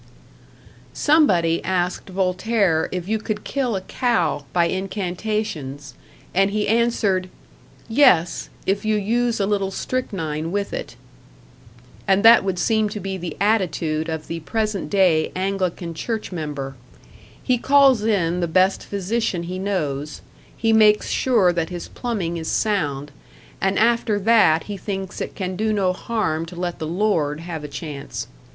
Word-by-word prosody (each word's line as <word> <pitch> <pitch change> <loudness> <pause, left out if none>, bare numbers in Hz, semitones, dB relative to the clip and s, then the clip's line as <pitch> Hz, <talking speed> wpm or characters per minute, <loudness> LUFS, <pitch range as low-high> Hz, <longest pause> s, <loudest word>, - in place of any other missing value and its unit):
Somebody 185 - +3
asked 180 +1 -1
Voltaire 185 -1 +1
if 180 -1 -4
you 220 +1 0
could 215 0 -4
kill 255 -6 -1
a 190 - -2
cow 230 - 0
by 175 -1 +3
incantations, 185 - -3 0.4
and 195 +2 +3
he 210 +1 -1
answered, 210 -5 +1 0.6
"Yes, 185 - +3 0.2
if 195 +1 0
you 215 0 +1
use 230 +3 0
a 200 - +2
little 200 -1 0
strychnine 165 -9 -3
with 200 +1 -2
it." - - -5 1.1
And 195 +2 +3
that 230 -1 +8
would 190 -2 -1
seem 220 +2 +1
to 210 - -5
be 195 0 -4
the 175 -4 -6
attitude 165 -6 0
of 160 -1 -4
the 165 - -5
present 215 +4 -2
day 180 -6 +3
Anglican 185 -2 -2
church 220 +6 -4
member; 145 -5 -4 0.7
he 250 -2 +1
calls 270 -4 +5
in 180 -6 +1
the 175 - 0
best 185 +4 +2
physician 200 -2 -2
he 180 +2 -5
knows, 150 -7 -3 0.4
he 225 -1 +2
makes 215 -1 +5
sure 215 -9 +3
that 165 -2 -1
his 175 -1 -6
plumbing 195 -9 -3
is 160 -1 -5
sound, 145 -10 -1 0.5
and 195 +1 +1
after 230 -1 +2
that 205 -7 +4
he 205 -1 -6
thinks 190 -1 -5
it - - -5
can 185 -1 -3
do 215 +3 0
no 195 -3 +1
harm 185 -6 -2
to 175 - -10
let 175 0 -4
the 155 - -3
Lord 165 -5 0
have 165 -3 -6
a - - -4
chance. 145 0 -6
190 Hz, 150 wpm, -22 LUFS, 170-215 Hz, 1.1 s, that